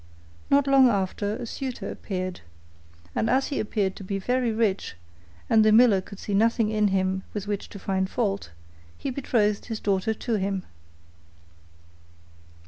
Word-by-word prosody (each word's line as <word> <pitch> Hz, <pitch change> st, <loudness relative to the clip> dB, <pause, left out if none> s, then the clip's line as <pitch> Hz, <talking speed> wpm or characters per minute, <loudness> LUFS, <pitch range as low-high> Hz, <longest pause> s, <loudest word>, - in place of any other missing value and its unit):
Not 280 Hz, 0 st, +4 dB
long 270 Hz, -2 st, +6 dB
after 200 Hz, 0 st, -1 dB
a 245 Hz, +1 st, -5 dB
suitor 255 Hz, +2 st, -5 dB
appeared, 185 Hz, -2 st, -4 dB, 0.7 s
and 225 Hz, -, 0 dB
as 265 Hz, +2 st, +2 dB
he 280 Hz, -, -2 dB
appeared 205 Hz, -3 st, -1 dB
to -, -, -8 dB
be 195 Hz, +1 st, -3 dB
very 245 Hz, +4 st, 0 dB
rich 215 Hz, -, 0 dB, 0.5 s
and 220 Hz, -1 st, +5 dB
the 215 Hz, -, +5 dB
miller 220 Hz, -3 st, +6 dB
could 195 Hz, +1 st, -11 dB
see 205 Hz, -, -5 dB
nothing 225 Hz, +1 st, +3 dB
in 215 Hz, -1 st, +2 dB
him 190 Hz, -1 st, 0 dB
with 205 Hz, -1 st, -3 dB
which 205 Hz, -1 st, -3 dB
to -, -, -9 dB
find 190 Hz, -1 st, -1 dB
fault, 200 Hz, -4 st, -1 dB, 0.5 s
he -, -, -3 dB
betrothed 220 Hz, -6 st, 0 dB
his 225 Hz, -2 st, -4 dB
daughter 200 Hz, +2 st, 0 dB
to 225 Hz, 0 st, -1 dB
him. 195 Hz, -1 st, -2 dB
210 Hz, 155 wpm, -26 LUFS, 195-235 Hz, 0.7 s, long